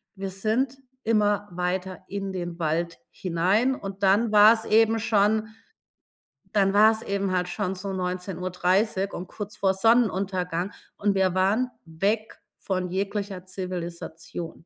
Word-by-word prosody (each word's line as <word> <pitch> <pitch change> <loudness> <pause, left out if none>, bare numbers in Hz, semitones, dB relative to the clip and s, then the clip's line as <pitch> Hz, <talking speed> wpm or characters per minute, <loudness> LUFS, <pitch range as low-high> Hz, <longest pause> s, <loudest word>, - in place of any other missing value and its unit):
wir 195 0 -4
sind 225 +7 -1 0.3
immer 205 -2 +1
weiter 180 +1 -3
in 195 -1 -4
den 175 -2 -5
Wald 165 +2 -1
hinein 190 +9 +1
und 195 -3 -7
dann 210 +4 +4
war's 215 +2 +7
eben 225 +1 +4
schon 215 0 +2 1.0
dann 195 -2 +3
war 215 +2 +7
es 220 0 -4
eben 200 -1 -1
halt 180 0 0
schon 195 -3 -2
so 195 +1 -5
19:30 185 +2 -1
und 180 - -5
kurz 210 0 -7
vor 190 -1 +2
Sonnenuntergang 190 -4 +1 0.3
und 205 -1 +1
wir 190 -2 +2
waren 210 +7 +2
weg 200 +7 -2 0.2
von 185 -2 -2
jeglicher 195 -1 -3
Zivilisation. 175 -2 -6
195 Hz, 130 wpm, -26 LUFS, 180-210 Hz, 1.0 s, war's